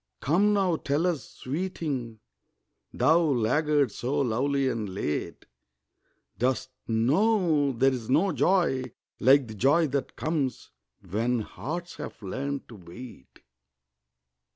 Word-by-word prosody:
Come 190 +9 +3
now 190 -5 +2
tell 145 +4 0
us, 170 -7 -1
sweeting, 135 - -4 0.7
Thou 160 +2 +4
laggard 145 -1 +2
so 135 +7 -2
lovely 135 +3 +1
and 110 -5 -2
late, 95 -6 -4 0.9
Dost 130 +1 0 0.2
know 150 - +2
there's 125 -2 0
no 165 +9 +3
joy 165 -5 +2 0.3
like 135 0 +5
the 110 - -8
joy 140 - +3
that 140 0 -3
comes 145 -6 -2 0.4
When 115 +5 0
hearts 170 +10 -6
have - - -7
learned 140 +8 -4
to 115 - -11
wait? 90 - -12
135 Hz, 110 wpm, -27 LUFS, 120-160 Hz, 0.9 s, like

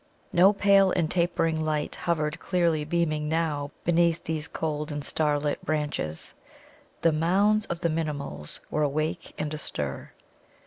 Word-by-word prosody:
No 185 +3 +7
pale 200 -1 +5
and 170 -4 0
tapering 165 -2 +1
light 155 -1 -1
hovered 155 -1 -1
clearly 170 -4 +1
beaming 155 -1 0
now 155 -3 0 0.2
beneath 170 -1 +3
these 160 -1 -2
cold 150 -1 -3
and 145 -1 -4
starlit 150 -1 0
branches. 145 - -2 0.7
The 165 - +5
Mounds 195 +7 +2
of 170 0 -4
the 170 - +2
Minimuls 150 - -3
were 155 - 0
awake 155 +4 -1
and 150 0 -3
astir. 75 - -4
155 Hz, 135 wpm, -27 LUFS, 150-170 Hz, 0.7 s, No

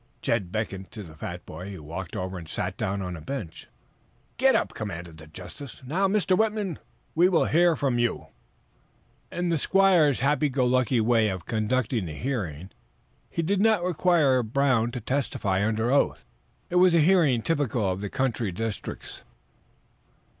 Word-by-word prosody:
Jed 100 -7 0
beckoned 95 -3 -4
to 105 - -7
the 80 -4 -12
fat 85 +3 -7
boy, 90 +6 -8
who 80 - -9
walked 85 +4 -6
over 95 0 -4
and 80 -2 -11
sat - - -3
down 95 +1 -2
on 90 -1 -4
a 80 - -9
bench. 100 - -6 0.7
"Get - - +4
up!" - - 0
commanded 85 -1 -6
the 80 0 -12
justice. 90 - -10
"Now, 180 +9 +1
Mr. 195 -2 +2
Whitman, 210 -5 0 0.3
we 175 +3 +4
will 170 -4 +3
hear 170 +1 +4
from 135 -5 0
you." 120 -1 0 1.1
In 175 0 -2
the 165 -2 +1
squire's 175 -8 +4
happy 150 +2 +2
go 130 -1 +1
lucky 125 0 +2
way 110 -1 +3
of 95 -3 -5
conducting 110 -2 -1
the 75 - -6
hearing, 95 - -4 0.6
he 165 - -2
did 195 +4 +1
not 220 -4 +3
require 165 -7 +3
Brown 120 0 +1
to 120 0 -6
testify 105 -6 -1
under 110 +3 0
oath. 140 - +1 0.5
It 180 - +2
was 180 -1 +6
a - - +5
hearing 155 -8 +4
typical 135 -9 0
of 95 +1 -2
the 105 - -4
country 120 -5 -1
districts. 110 +3 -5
120 Hz, 170 wpm, -26 LUFS, 95-160 Hz, 1.1 s, was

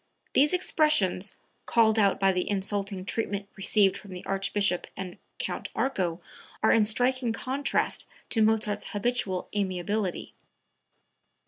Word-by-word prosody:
These 290 +2 +5
expressions, 300 - +2 0.3
called 225 -1 +4
out 200 -2 +3
by 195 -1 +4
the 180 -1 -1
insulting 200 -1 -1
treatment 200 -2 -2
received 195 0 +3
from 200 - -9
the 180 - -8
Archbishop 195 -1 0
and 185 -2 -6 0.2
Count - - -4
Arco, 185 -10 0 0.4
are 220 - +5
in 225 -2 +5
striking 245 +2 +1
contrast 270 +4 -1 0.2
to 225 - +2
Mozart's 215 -1 +2
habitual 205 -4 -1
amiability.) 195 0 -2
205 Hz, 120 wpm, -28 LUFS, 190-225 Hz, 0.4 s, These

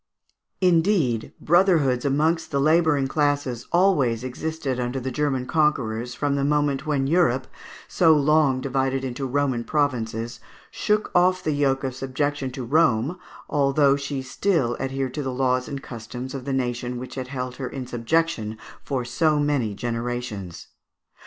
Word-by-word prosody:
Indeed, 165 - +2
brotherhoods 160 -8 +3
amongst 155 +4 +1
the 140 - 0
labouring 155 -2 +3
classes 145 -4 -1
always 145 - +3
existed 135 0 -3
under 125 +2 -2
the 130 +1 -4
German 135 -1 -1
conquerors 125 -6 0
from 145 -1 0
the 140 0 0
moment 145 0 +1
when 140 -3 +1
Europe, 135 -5 +2 0.4
so 165 -3 +4
long 150 -3 +3
divided 135 0 -1
into 130 +1 -3
Roman 130 -3 0
provinces, 115 -5 -1 0.3
shook 210 0 0
off 185 +1 +3
the 155 - 0
yoke 140 -2 +1
of 130 -1 -2
subjection 135 +1 -2
to 130 - -5
Rome, 150 +2 +2 0.3
although 140 0 +3
she 140 -1 -4
still 130 -3 0
adhered 135 -1 -2
to 150 - -3
the 135 -2 -3
laws 125 0 0
and 140 -1 -6
customs 125 +2 -7
of 135 -2 -6
the 140 - -2
nation 125 -1 -2
which 125 +1 -7
had 130 -1 -5
held 125 -1 -5
her 130 -2 -4
in 130 -2 -6
subjection 120 -2 -1 0.3
for 130 -3 -2
so 150 +5 +1
many 140 -8 0
generations. 115 -5 -4
135 Hz, 150 wpm, -24 LUFS, 125-150 Hz, 0.4 s, so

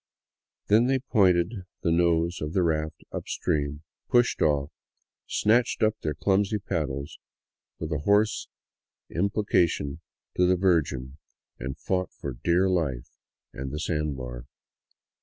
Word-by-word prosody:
Then 110 +4 +4
they 135 0 +3
pointed 95 -5 +2 0.2
the 85 - +2
nose 85 0 +2
of 75 +1 -3
the 95 - +2
raft 80 -2 -1
up - - -5
stream, 75 0 -1 0.3
pushed 120 0 +3
off, 75 -1 +2 0.6
snatched 120 +3 +2
up 110 0 +3
their 75 -1 -2
clumsy 100 +5 +1
paddles 70 -7 -3 0.6
with 80 0 -5
a 75 - 0
hoarse 105 +7 +2 0.6
imploration 85 -6 +1 0.4
to 90 - +4
the 90 - +4
Virgin, 75 -8 +1 0.4
and 65 +2 -5
fought 95 -1 -1
for 70 - -5
dear 90 +3 +3
life 75 -10 -1 0.4
and 65 0 -5
the 75 - -4
sand 75 -3 -1
bar. - - -7
85 Hz, 130 wpm, -27 LUFS, 75-95 Hz, 0.6 s, Then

